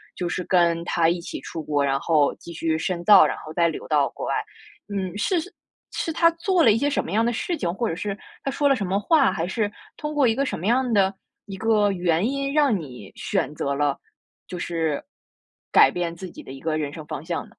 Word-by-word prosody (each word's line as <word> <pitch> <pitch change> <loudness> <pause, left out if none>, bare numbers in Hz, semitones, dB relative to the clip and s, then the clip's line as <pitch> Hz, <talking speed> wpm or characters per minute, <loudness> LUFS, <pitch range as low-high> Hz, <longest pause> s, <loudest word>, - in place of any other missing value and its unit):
就 175 -1 -3
是 180 - -2
跟 170 -2 +2
他 165 -2 +2
一 175 - 0
起 170 - -7
出 165 -2 -6
国， 145 -2 0
然 135 0 +1
后 155 -4 +2
继 170 - -11
续 160 -1 -1
深 175 +1 -2
造， 210 - +8
然 - - -1
后 155 - -9
再 170 +1 +2
留 160 - -5
到 145 -3 +3
国 - - -6
外。 - - 0 0.6
嗯， 190 -1 -3
是 355 - +1 0.5
是 325 - -3
他 335 +1 +5
做 345 +1 +1
了 225 - +7
一 215 - +3
些 285 - +1
什 290 - 0
么 - - -8
样 225 +2 +3
的 240 - +1
事 340 +9 -2
情， 175 - -2
或 230 +3 -1
者 - - -2
是 195 +2 -3 0.3
他 275 - -1
说 285 +1 +2
了 275 - +4
什 205 - -3
么 190 +2 0
话， 280 +6 +4
还 170 -2 -2
是 210 +2 -1 0.3
通 300 0 -4
过 285 -4 +3
一 225 - +2
个 275 - 0
什 - - -3
么 180 - -6
样 250 +2 +2
的 195 -1 +3 0.3
一 195 -2 -7
个 210 -1 +2
原 175 -1 +1
因， 275 0 -2
让 285 -8 +3
你 125 - -10
选 - - -2
择 140 - -1
了， 145 -1 +1 0.5
就 180 - -6
是 165 -4 -2 0.7
改 - - +7
变 170 -1 -3
自 185 +1 -8
己 - - -11
的 - - -10
一 135 - -10
个 155 -1 -1
人 145 -2 -2
生 155 -2 -8
方 145 - -6
向 170 -1 -2
呢？ - - -20
180 Hz, 265 characters per minute, -24 LUFS, 165-230 Hz, 0.7 s, 造